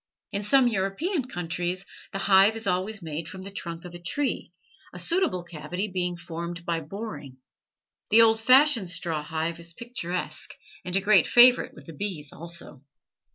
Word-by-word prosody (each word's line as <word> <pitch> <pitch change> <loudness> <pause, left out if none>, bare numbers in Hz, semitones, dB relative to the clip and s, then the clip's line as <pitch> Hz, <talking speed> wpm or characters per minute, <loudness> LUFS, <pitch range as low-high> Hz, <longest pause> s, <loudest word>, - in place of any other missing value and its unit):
In 200 - -2
some 250 +5 +4
European 240 - -1
countries 175 0 -3 0.3
the - - -3
hive 195 +2 +5
is 225 - -5
always 190 +2 -1
made 160 0 -5
from 185 0 -8
the 200 - -8
trunk 170 -3 -6
of 175 - -9
a 175 - -8
tree, 275 +11 -2 0.4
a - - -10
suitable 335 - +1
cavity 175 +4 -4
being 180 -1 -1
formed 170 0 -6
by 165 -1 -1
boring. 150 - -7 0.7
The 225 +2 +7
old 225 0 +4
fashioned 255 - +5
straw 165 -2 -1
hive 160 +2 -3
is 170 0 -7
picturesque, 180 -6 -4 0.3
and 180 0 -2
a 195 - +3
great 190 -4 +5
favorite 245 +1 +6
with 150 - -13
the 165 - -10
bees 155 -4 -4
also. 170 -5 -8
180 Hz, 165 wpm, -26 LUFS, 170-215 Hz, 0.7 s, The